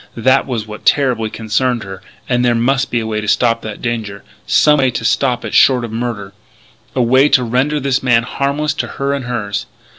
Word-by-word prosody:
That 130 +4 +2
was 115 -5 -3
what 105 0 -10
terribly 125 -6 +2
concerned 115 +2 -1
her. 95 -1 -9 0.3
And 125 -1 +1
there 120 -1 +2
must 135 +3 +1
be 120 - 0
a 115 - -4
way 110 -1 -2
to 105 - -6
stop 115 +1 +2
that 110 -1 -8
danger 110 -4 -4 0.2
some 150 -1 +4
way 130 -1 +3
to 120 - -4
stop 125 -3 0
it - - -6
short 125 -3 +4
of 115 - -8
murder, 115 -4 -4 0.6
a 130 - +2
way 130 +4 +4
to 130 - +3
render 130 +6 0
this 135 -2 0
man 115 -3 +3
harmless 140 +4 -2
to - - -2
her 140 0 -1
and 140 -3 -4
hers. 110 -5 -3
120 Hz, 210 wpm, -16 LUFS, 110-135 Hz, 0.6 s, some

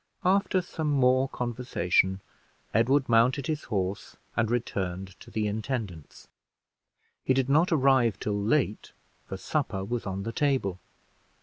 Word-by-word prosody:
After 190 0 +2
some 160 -3 -3
more 130 -1 +3
conversation, 110 -7 0 0.5
Edward 130 +5 +3
mounted 125 +4 +3
his 155 -1 -3
horse 100 -3 -3 0.2
and 115 -2 +1
returned 95 -6 -2
to - - -13
the 110 -1 -1
intendant's. 105 - -4 1.0
He 130 - +2
did 135 0 +1
not 160 +6 +4
arrive 130 -8 +3
till 105 - -2
late, 110 0 0 0.3
for 95 - -5
supper 110 -5 -2
was 120 0 -3
on 95 0 -3
the 115 - -3
table. 130 -11 0
120 Hz, 130 wpm, -28 LUFS, 100-135 Hz, 1.0 s, not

